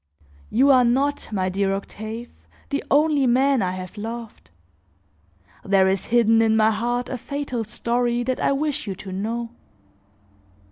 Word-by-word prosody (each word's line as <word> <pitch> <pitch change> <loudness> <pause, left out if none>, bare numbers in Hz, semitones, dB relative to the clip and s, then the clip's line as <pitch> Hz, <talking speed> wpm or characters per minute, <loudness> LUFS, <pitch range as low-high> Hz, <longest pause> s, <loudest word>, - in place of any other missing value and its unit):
"You 270 +5 +4
are 255 -2 +6
not, 275 +4 0
my 190 -3 -1
dear 195 +1 0
Octave, 220 +4 -7 0.4
the 280 - -2
only 290 -2 +3
man 265 +1 +3
I 185 -1 -1
have 185 +2 -8
loved. 225 - -7 1.1
There 195 -1 +3
is 190 -1 0
hidden 225 -1 +4
in 220 -1 +3
my 220 0 +4
heart 240 +3 -1
a 255 - -5
fatal 280 -3 -4
story 240 +2 -1
that 255 +1 -2
I - - +1
wish 285 -4 -2
you 195 - -3
to 190 +1 -9
know. 230 +5 -3
235 Hz, 150 wpm, -23 LUFS, 205-255 Hz, 1.1 s, are